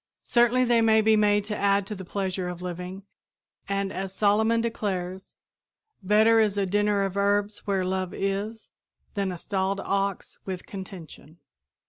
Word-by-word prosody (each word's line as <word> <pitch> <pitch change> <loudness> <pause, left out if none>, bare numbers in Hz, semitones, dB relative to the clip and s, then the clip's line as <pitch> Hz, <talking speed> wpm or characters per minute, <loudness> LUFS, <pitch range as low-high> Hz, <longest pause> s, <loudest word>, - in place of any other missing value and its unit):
Certainly 240 +1 +3
they 235 -1 +3
may 220 -1 +5
be 220 0 +4
made 205 -1 +3
to 210 0 -3
add 200 -1 +2
to 210 - -5
the 190 -2 -7
pleasure 185 -1 -3
of 180 0 -7
living 180 +2 -6 0.7
and, 195 -1 -1
as 190 0 -4
Solomon 220 +2 +3
declares, 190 -5 -3 0.7
"better 215 +3 +4
is 210 -2 +2
a 200 - +2
dinner 205 +1 +1
of 195 -1 -3
herbs 205 +1 +1
where 195 -2 +1
love 185 -1 -2
is, 200 +3 -3 0.4
than 200 -2 -1
a 180 - -5
stalled 195 +2 -1
ox 195 -1 -2
with 185 -2 -6
contention." 180 -5 -10
200 Hz, 155 wpm, -26 LUFS, 190-210 Hz, 0.7 s, may